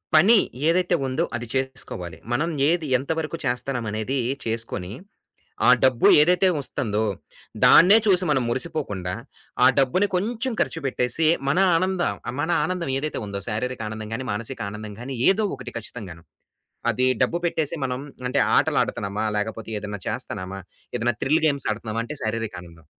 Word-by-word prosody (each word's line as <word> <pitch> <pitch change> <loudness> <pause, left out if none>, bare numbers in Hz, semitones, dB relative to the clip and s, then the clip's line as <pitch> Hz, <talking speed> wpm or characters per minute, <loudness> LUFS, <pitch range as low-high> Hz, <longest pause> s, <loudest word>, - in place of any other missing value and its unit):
పని 200 +9 +7 0.3
ఏదైతే 175 +1 +3
ఉందో 130 +6 0
అది 120 0 -4
చేసుకోవాలి. 130 -11 -3 0.2
మనం 150 +7 +1 0.2
ఏది 170 -2 0
ఎంత 135 +5 -4
వరకు 160 +1 -4
చేస్తున్నాం 125 -1 -2
అనేది 110 +6 -2 0.3
చేసుకొని, 110 -5 -3 0.8
ఆ - - +8
డబ్బు 130 -3 +3 0.2
ఏదైతే 180 +4 +4
వస్తుందో 110 -6 -1 0.6
దాన్నే 195 +6 +8
చూసి 185 -2 +4
మనం 130 -3 +2
మురిసిపోకుండా, 120 - -2 0.5
ఆ - - +9
డబ్బుని 140 +10 +2
కొంచెం 235 +6 -1
ఖర్చు 165 - -1
పెట్టేసి 135 +4 +1 0.2
మన 145 - +1 0.2
ఆనంద 185 +1 +1 0.4
మన 160 - -2 0.2
ఆనందం 180 -5 -2
ఏదైతే 150 +2 -3
ఉందో, 100 -1 -5
శారీరక 125 +3 -3
ఆనందం 110 0 -6
గాని, 130 - -5
మానసిక 115 +4 -4
ఆనందం 105 0 -8
గాని, 135 +2 -5
ఏదో 210 +3 +2
ఒకటి 130 -2 -9
ఖచ్చితంగాను. 100 -7 -7 0.7
అది 120 +3 0 0.2
డబ్బు 145 +7 +1
పెట్టేసి 160 -3 -1
మనం 125 0 -2 0.3
అంటే 125 - 0 0.2
ఆటలాడుతున్నామా, 100 +2 0
లేకపోతే 110 +1 -4
ఏదైనా 105 -1 -6
చేస్తున్నామా, 95 +1 -5 0.4
ఏదైనా 120 +1 0
థ్రిల్ 155 +4 +2
గేమ్స్ 140 -4 0
ఆడుతున్నామా 110 +1 -4
అంటే 150 - -6
శారీరక 110 0 -2
ఆనందం. 85 -2 -15
125 Hz, 145 wpm, -24 LUFS, 110-160 Hz, 0.8 s, ఆ